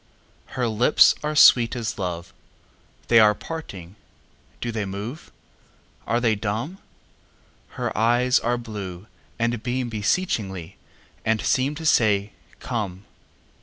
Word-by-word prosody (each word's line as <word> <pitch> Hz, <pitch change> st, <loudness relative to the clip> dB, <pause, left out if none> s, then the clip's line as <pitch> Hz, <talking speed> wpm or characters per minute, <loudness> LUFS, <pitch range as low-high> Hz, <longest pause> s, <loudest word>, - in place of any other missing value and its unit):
Her 125 Hz, -2 st, +1 dB
lips 115 Hz, +6 st, +5 dB
are 150 Hz, 0 st, -3 dB
sweet 120 Hz, -5 st, +6 dB
as 115 Hz, -3 st, -4 dB
love; 85 Hz, -2 st, -4 dB, 0.7 s
They 115 Hz, -, +6 dB
are 105 Hz, -1 st, +5 dB
parting! 100 Hz, -, -8 dB, 0.6 s
Do 120 Hz, -, -3 dB
they 110 Hz, -2 st, -2 dB
move? 105 Hz, -, -7 dB, 0.8 s
Are 120 Hz, -, +1 dB
they 115 Hz, -2 st, +2 dB
dumb? 110 Hz, -, -3 dB, 1.0 s
Her -, -, -3 dB
eyes 120 Hz, +3 st, +3 dB
are 120 Hz, +1 st, 0 dB
blue, 100 Hz, -6 st, -7 dB, 0.3 s
and 115 Hz, -1 st, -1 dB
beamBeseechingly, 110 Hz, -, -2 dB, 0.5 s
and 110 Hz, 0 st, +1 dB
seemTo 145 Hz, +8 st, 0 dB
say, 105 Hz, -7 st, +2 dB, 0.3 s
"Come!" 105 Hz, -6 st, -4 dB
115 Hz, 110 wpm, -23 LUFS, 100-125 Hz, 1.0 s, sweet